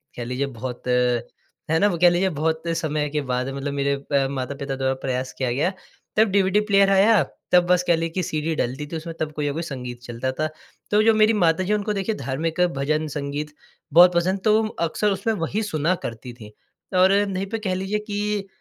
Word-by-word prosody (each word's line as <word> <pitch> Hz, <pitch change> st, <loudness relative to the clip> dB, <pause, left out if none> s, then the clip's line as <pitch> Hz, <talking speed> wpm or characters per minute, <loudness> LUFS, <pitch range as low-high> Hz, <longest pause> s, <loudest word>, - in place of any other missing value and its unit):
कह 120 Hz, -, -5 dB
लीजिए 125 Hz, +3 st, -2 dB
बहुत, 125 Hz, -1 st, -7 dB
है 125 Hz, +5 st, -1 dB
ना, 205 Hz, -, +4 dB
वो 180 Hz, -4 st, -1 dB
कह 175 Hz, -, +8 dB
लीजिए 175 Hz, +2 st, +1 dB
बहुत 160 Hz, 0 st, -1 dB
समय 150 Hz, -1 st, -1 dB
के 150 Hz, +1 st, -1 dB
बाद 125 Hz, -1 st, -2 dB
मतलब 140 Hz, +1 st, -4 dB
मेरे 140 Hz, 0 st, 0 dB
अ, 140 Hz, 0 st, 0 dB
माता-पिता 140 Hz, +1 st, -4 dB
द्वारा 130 Hz, 0 st, 0 dB
प्रयास 130 Hz, -1 st, -2 dB
किया 130 Hz, -2 st, -1 dB
गया, 150 Hz, +9 st, +1 dB, 0.4 s
तब 220 Hz, +1 st, +5 dB
डीवीडी 195 Hz, 0 st, +3 dB
प्लेयर 195 Hz, -1 st, +5 dB
आया, 195 Hz, +1 st, +5 dB, 0.3 s
तब 180 Hz, -1 st, +5 dB
बस 180 Hz, 0 st, +3 dB
कह 170 Hz, -, +5 dB
लें 165 Hz, 0 st, -2 dB
कि 185 Hz, +2 st, -2 dB
सीडी 155 Hz, 0 st, -2 dB
डलती 135 Hz, +2 st, -2 dB
थी, 165 Hz, -, -6 dB
उसमें 165 Hz, +1 st, -6 dB
तब 155 Hz, -1 st, -2 dB
कोई 150 Hz, -1 st, -3 dB
ना 145 Hz, -, -1 dB
कोई 165 Hz, -, -3 dB
संगीत 125 Hz, -5 st, -6 dB
चलता 120 Hz, +2 st, -3 dB
था। 155 Hz, -, +1 dB, 0.4 s
तो 210 Hz, +1 st, +5 dB
जो 225 Hz, 0 st, +5 dB
मेरी 215 Hz, +1 st, +4 dB
माता 175 Hz, -3 st, +2 dB
जी 200 Hz, +3 st, 0 dB
उनको 210 Hz, 0 st, 0 dB
देखिए 205 Hz, +2 st, -2 dB
धार्मिक 155 Hz, -, -2 dB, 0.2 s
भजन 155 Hz, +3 st, 0 dB
संगीत 145 Hz, +1 st, -4 dB, 0.4 s
बहुत 175 Hz, +2 st, +8 dB
पसंद, 185 Hz, +3 st, +1 dB
तो 215 Hz, +1 st, +4 dB
अक्सर 205 Hz, +1 st, -1 dB
उसमें 195 Hz, +4 st, -1 dB
वही 205 Hz, +3 st, -2 dB
सुना 165 Hz, -3 st, 0 dB
करती 120 Hz, +2 st, -6 dB
थी। 110 Hz, -3 st, -12 dB, 0.4 s
और 185 Hz, +1 st, +5 dB, 0.2 s
नहीं 190 Hz, 0 st, -2 dB
पे 225 Hz, -, -2 dB
कह 195 Hz, -4 st, -2 dB
लीजिए 195 Hz, +3 st, -2 dB
कि 210 Hz, -1 st, -3 dB
160 Hz, 210 wpm, -23 LUFS, 135-195 Hz, 0.4 s, कह